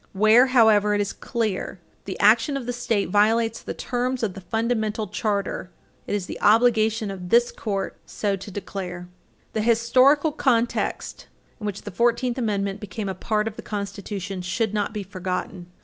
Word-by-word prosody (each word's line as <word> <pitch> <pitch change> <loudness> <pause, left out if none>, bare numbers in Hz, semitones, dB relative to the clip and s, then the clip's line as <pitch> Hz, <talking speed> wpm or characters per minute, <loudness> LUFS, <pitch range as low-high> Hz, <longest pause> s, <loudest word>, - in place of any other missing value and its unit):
Where, 215 +6 +6
however, 220 -5 +4
it - - 0
is 200 - -2
clear 215 -5 -3
that - - -38
the 190 - -6
action 230 +7 +4
of 260 - -6
the 245 - -2
State 230 -6 -1
violates 225 +3 +2
the - - -6
terms 250 0 -2
of 205 -4 0
the 195 - -9
fundamental 220 +2 -1
charter, 200 -4 -2 0.4
it - - -1
is 200 -3 -2
the - - -8
obligation 220 -1 +3
of 180 -2 -7
this 240 +3 +4
Court 200 -3 -3
so 205 -2 -1
to 195 +2 -9
declare. 180 -2 -6 0.5
The 220 - 0
historical 255 +7 +4
context 240 -5 -1 0.3
in 210 - -4
which 205 -1 -5
the 205 - -7
Fourteenth 240 +5 +1
Amendment 200 -3 -1
became 210 0 -5
a - - -2
part 210 +3 -1
of 220 - -6
the - - -6
Constitution 200 -2 -5
should 200 +4 -1
not 205 -1 -1
be 210 -1 -4
forgotten. 185 -1 -5
215 Hz, 175 wpm, -24 LUFS, 195-230 Hz, 0.5 s, Where